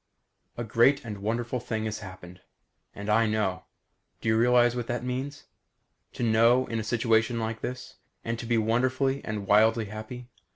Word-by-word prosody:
A 120 - -3
great 120 +5 +3
and 105 -3 -6
wonderful 115 +4 -2
thing 110 -2 -3
has 110 -1 -3
happened. 95 -2 -11 0.5
And 100 +1 -7
I 110 +2 +3
know. 105 -4 -1 0.5
Do - - -2
you 110 - +3
realize 120 +1 +4
what 120 -2 -3
that 120 0 -3
means? 130 +3 -4 0.7
To - - -4
know 115 +3 +4
in 115 - -3
a - - -3
situation 115 +1 +1
like 110 0 -3
this? 125 0 -6 0.3
And 115 0 -2
to 115 - -6
be 120 0 +2
wonderfully 130 +5 +1
and 105 -2 -4
wildly 110 +2 +4
happy? 110 +4 -8
115 Hz, 170 wpm, -27 LUFS, 110-125 Hz, 0.7 s, realize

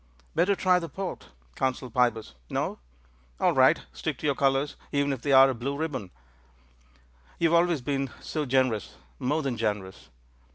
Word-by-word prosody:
"Better 200 +3 +3
try 185 -1 +3
the 165 -2 -6
port," 190 -2 -6 0.3
counselled 130 -2 -2
Pybus. 115 - +1 0.2
"No? - - -2 0.6
All - - +3
right; - - +4
stick - - -3
to - - -7
your 145 - +3
colours, 135 +1 +1 0.2
even 140 0 +1
if 130 - -6
they're 135 -1 +6
a - - -2
blue 135 +4 -4
ribbon." 145 - -3 1.3
"You 165 - +3
have 170 0 +6
always 170 -5 0
been 135 0 -1
so 150 -3 -3
generous 125 -5 +1
— - - -28
^more 150 +5 0
than 130 -4 -2
generous. 105 -4 -3
135 Hz, 165 wpm, -27 LUFS, 125-150 Hz, 1.3 s, they're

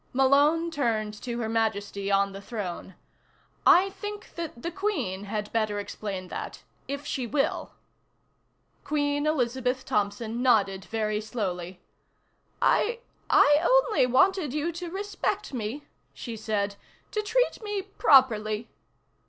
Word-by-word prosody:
Malone 290 +6 +4
turned 225 -8 0
to 235 +3 -5
Her 225 - -1
Majesty 205 -3 -1
on 200 0 +3
the 195 0 -8
throne. 195 -4 -6 0.7
"I 385 +2 +6
think 415 +1 -7
that 330 -8 -6
the 340 - -2
Queen 345 - -2
had 210 0 -4
better 215 -2 0
explain 200 -2 -5
that - - -6 0.2
if 280 +2 -4
she 255 -4 -2
will." 275 +4 -1 1.1
Queen 290 0 0
Elizabeth 255 -3 0
Thompson 215 +3 -1
nodded 200 -6 +2
very 215 -1 -1
slowly. 185 -5 -4 0.8
"I 470 +2 +2 0.3
I 290 0 +6
only - - +4
wanted 300 +2 +3
you 305 +3 0
to 345 +1 -6
respect 400 -1 -3
me," 240 +4 -4 0.3
she 235 -3 -6
said. 205 -2 -2 0.3
"To 425 - 0
treat 485 +4 +1
me 415 -2 -3
properly." 235 - +3
245 Hz, 125 wpm, -27 LUFS, 210-330 Hz, 1.1 s, I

